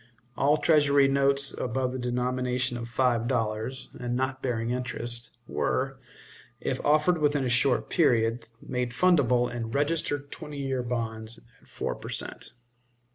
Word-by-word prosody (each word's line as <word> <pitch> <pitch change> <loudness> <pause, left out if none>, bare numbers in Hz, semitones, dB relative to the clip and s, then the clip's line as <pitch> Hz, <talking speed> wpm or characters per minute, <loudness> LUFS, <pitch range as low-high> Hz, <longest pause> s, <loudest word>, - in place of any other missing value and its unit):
All 145 +5 +3
Treasury 145 -3 +5
notes 140 0 +2
above 130 +1 -1
the 130 - -4
denomination 125 0 -1
of 120 -1 -5
five 120 -2 +1
dollars, 115 +1 -2
and 120 0 -2
not 130 +1 -1
bearing 120 -2 -1
interest, 120 -1 -3
were, 135 +1 -1 0.6
if 130 - -2
offered 155 +4 +3
within 145 -2 +2
a - - 0
short 125 +2 +2
period, 115 -7 +2 0.2
made 125 -2 -2
fundable 130 -7 +4
in 120 -2 -4
registered 145 +1 -1
twenty 150 -1 -7
years 135 -3 -2
bonds 115 -1 -3 0.2
at - - -23
four - - -3
per - - -9
cent. - - -4
125 Hz, 140 wpm, -28 LUFS, 120-140 Hz, 0.6 s, Treasury